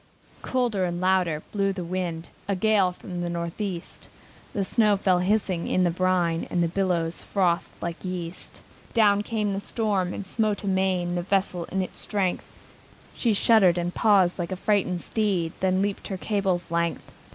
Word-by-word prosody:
Colder 240 -7 0
and 175 -1 -1
louder 185 -4 +1
blew 200 -1 +1
the 185 -2 -4
wind, 170 -2 -3 0.2
A 200 - +1
gale 200 -1 +3
from 180 0 -7
the 175 - -2
Northeast, 170 +2 -5 0.4
The 195 - -1
snow 210 -1 +3
fell 185 -2 +2
hissing 185 -2 0
in 185 - +2
the 175 - +2
brine, 175 -2 +1
And 175 - +1
the - - +2
billows 170 -2 -1
frothed 180 -4 0
like 170 0 -5
yeast. 180 -2 -6 0.3
Down 205 -3 +5
came 210 -2 -1
the 195 - -2
storm, 200 -3 -1
and 200 - -5
smote 215 +1 -1
amain, 190 -2 +1
The 175 - -1
vessel 185 -2 0
in 190 +2 -1
its - - -7
strength: 195 -4 -2 0.6
She 230 -3 +1
shuddered 200 -4 +5
and 175 0 -1
paused, 195 -5 +3
like 175 0 -3
a - - -1
frighted 185 -3 0
steed, 190 -7 0
Then 190 0 +2
leaped 200 -1 -3
her 190 - -4
cable's 190 -4 -1
length. 170 0 -1
185 Hz, 170 wpm, -26 LUFS, 175-200 Hz, 0.6 s, Down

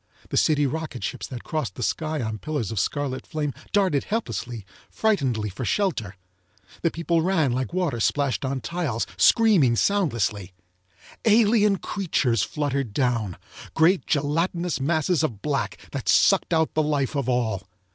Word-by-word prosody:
The - - -3
city 145 -2 +3
rocket 155 -2 -4
ships - - -4
that 125 -3 -7
crossed 150 - -3
the - - -4
sky 155 -4 -1
on 110 -1 -4
pillars 145 -7 -3
of 110 - -1
scarlet 140 +3 -2
flame 150 -3 -2 0.2
darted 190 -9 +2
helplessly, 120 - -3 0.2
frightenedly 135 - 0
for 100 - -6
shelter. 120 - -1 0.7
The 170 - +2
people 170 0 0
ran 160 -6 +2
like 130 +1 -2
water 175 -9 -1
splashed 140 +2 0
on 135 0 -2
tiles, 140 -3 -2
screaming 195 - +5
soundlessly. 115 - 0 0.7
Alien 210 -2 +4
creatures 150 - 0
fluttered 135 -1 -2
down, 115 -8 0 0.4
great 170 +4 +3
gelatinous 165 +2 0
masses 160 +3 +1
of 115 -11 -3
black 135 -9 -1
that - - -4
sucked - - +4
out 160 -1 +2
the 155 - +2
life 150 -2 0
of 135 -3 -1
all. 115 -6 0
145 Hz, 145 wpm, -24 LUFS, 120-170 Hz, 0.7 s, screaming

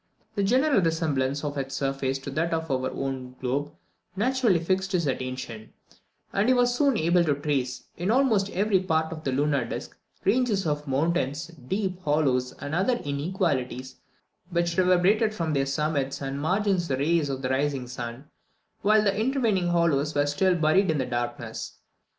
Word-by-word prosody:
The 205 - -1
general 255 +4 +3
resemblance 150 -5 0
of 145 -1 -2
its 135 0 -4
surface 135 -1 -1
to 135 +1 -7
that 165 +3 0
of 160 -2 -3
our 130 -1 0
own 130 -2 -4
globe 140 +3 -2 0.4
naturally 240 -2 +2
fixed 190 +3 -1
his 175 -3 +1
attention; 130 -4 -4 0.6
and 200 +3 +2
he 255 - +5
was 245 0 +3
soon 275 -2 +2
able 170 +2 +3
to 150 -4 +1
trace, 140 -4 -2
in 175 +3 -2
almost 225 -5 +3
every 200 0 +2
part 160 -3 0
of 155 -1 -9
the 135 - -1
lunar 140 0 +1
disc, 115 - -6 0.3
ranges 210 -2 +2
of 150 -1 -2
mountains, 155 +2 0 0.2
deep 190 0 -2
hollows, 140 -5 +1
and 145 +1 -7
other 195 +9 +2
inequalities, 140 - -2 0.5
which 170 -1 0
reverberated 185 +5 +3
from 165 -5 -1
their 135 -1 +1
summits 140 -1 -1
and 135 0 -4
margins 190 +1 +1
the 130 - 0
rays 155 +1 +1
of 135 0 -4
the 130 - -1
rising 135 -1 0
sun, 120 +2 -6 0.6
while 210 +1 +4
the 200 -1 +2
intervening 220 -6 +1
hollows 165 -4 +1
were 145 0 +3
still 180 +6 +2
buried 165 +4 +3
in 160 - +2
darkness. 120 0 -4
160 Hz, 165 wpm, -26 LUFS, 135-190 Hz, 0.6 s, he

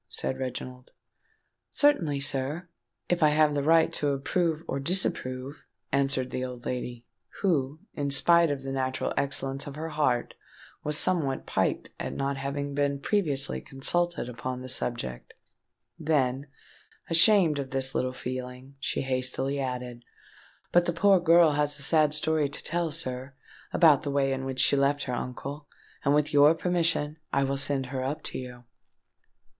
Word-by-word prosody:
said 130 - -3
Reginald. 125 -1 -6 0.8
"Certainly, 170 - +2
sir—if 150 +5 -3
I 155 - +6
have 150 0 +3
the 145 - 0
right 160 +2 +4
to 145 - -1
approve 160 +4 0
or 135 - -2
disapprove," 135 -4 -2 0.3
answered 135 -2 0
the 130 - -3
old 125 -1 -7
lady, 125 -1 -4 0.4
who, 150 -5 0
in 140 -1 -2
spite 170 +4 +4
of 140 -2 -3
the 135 - -4
natural 130 -1 -2
excellence 135 0 -1
of 140 - -7
her 160 +2 -5
heart, 145 -6 0 0.5
was 150 0 +3
somewhat 155 -7 +3
piqued - - -1
at - - -4
not 140 0 -1
having 140 +1 -4
been 140 0 0
previously 145 -6 0
consulted 170 +4 -1
upon 125 +1 -5
the 130 - -6
subject: 115 - -3 0.6
then, 140 -3 0 0.6
ashamed 165 -3 +4
of 135 -1 -4
this 135 0 0
littleness 130 0 -2
of - - -12
feeling, 130 +1 -6
she - - -2
hastily 130 +1 -1
added, 125 -2 -4 0.7
"But 175 0 +4
the 175 - 0
poor 195 +2 +4
girl 170 -2 +5
has 145 0 0
a 140 - -2
sad 155 0 +3
story 155 -1 +1
to 145 - -5
tell, 170 0 0
sir, 130 -3 -3 0.4
about 155 -5 +5
the 145 - -4
way 140 -1 +1
in 135 0 -4
which 130 -1 -1
she 130 - +4
left 140 +1 +1
her 125 - -4
uncle; 140 +4 -5 0.4
and, 140 +1 +3
with 150 0 +1
your 145 +2 +6
permission, 165 -3 0
I 140 - +2
will 135 0 -1
send 135 -1 0
her 130 0 -4
up 140 +4 -3
to - - -5
you." 125 -1 -9
140 Hz, 160 wpm, -27 LUFS, 130-155 Hz, 0.8 s, I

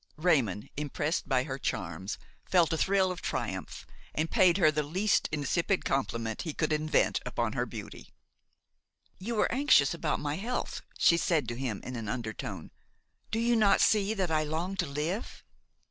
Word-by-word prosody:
Raymon, 130 - +1
impressed 150 +1 -2
by 130 -2 +3
her 135 -1 -5
charms, 95 -2 -3 0.3
felt 175 -4 +4
a - - +1
thrill 190 -1 +3
of 180 - -6
triumph - - -4 0.3
and 160 +1 -1
paid 180 -1 +5
her 155 -5 +5
the 150 0 0
least 185 +8 +1
insipid 165 +5 0
compliment 115 -4 -1
he 160 -4 -5
could 155 -1 0
invent 155 +1 +2
upon - - -2
her - - -1
beauty. - - -9 1.1
"You 225 +5 -3
were 210 - +2
anxious 255 - +4
about 165 -2 -1
my 145 +1 -2
health," 240 +6 -3 0.2
she 170 - +5
said 160 -7 +1
to 120 - -3
him 125 -5 -3
in 130 - -6
an 115 -3 -4
undertone; 110 -1 -5 0.6
"do - - -1
you 235 +1 +2
not 215 -3 +4
see 210 0 +3
that 185 -5 -1
I 155 -1 +2
long 165 +5 -2
to 180 -3 0
live?" 155 +10 -4
155 Hz, 170 wpm, -30 LUFS, 135-190 Hz, 1.1 s, paid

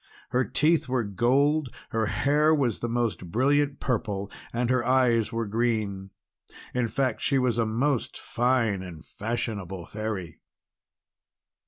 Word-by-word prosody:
Her 125 +1 +2
teeth 155 +1 +2
were 125 -2 +1
gold, 135 +8 +2 0.2
her 110 -1 0
hair 150 +6 +3
was 125 -8 +1
of - - -22
the 120 - -2
most 115 -7 -2
brilliant 140 - +2
purple, 105 -5 -2 0.2
and 120 +1 0
her 130 -2 +2
eyes 120 -3 +3
were 115 -1 -1
green. 105 -3 -1 0.6
In 125 -2 +1
fact 130 0 -1
she 140 - +2
was 125 -2 +1
a 115 - +2
most 125 +4 -1
fine 115 -5 +1
and 85 -4 -9
fashionable 100 -5 -4
Fairy. 100 -6 -5
120 Hz, 140 wpm, -27 LUFS, 105-130 Hz, 0.6 s, hair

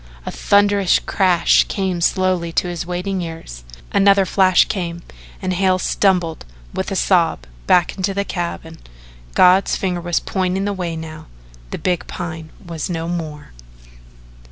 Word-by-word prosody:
A - - -4
thunderous 200 -2 +3
crash 180 -3 +3
came 190 -3 -2
slowly 185 -1 +1
to 180 - +1
his 175 -1 -5
waiting 180 +1 -2
ears, 160 - -8 0.3
another 195 0 +4
flash 185 -1 +4
came, 170 -3 -4 0.4
and 185 0 0
Hale 185 0 +2
stumbled, 180 -4 0 0.3
with - - -3
a - - -1
sob, - - +2 0.3
back 175 -1 +3
into 195 +1 -1
the 200 0 -1
cabin. 170 -3 -5 0.6
God's 185 +2 +5
finger 180 -2 -2
was 175 -1 0
pointing 190 +1 -1
the 205 - -1
way 175 -3 -4
now 160 -1 -8 0.4
the - - -5
big 180 -2 -1
Pine 160 -2 -6 0.2
was 165 -1 -5
no 165 -1 -3
more. 160 -4 -5
180 Hz, 145 wpm, -19 LUFS, 170-190 Hz, 0.6 s, God's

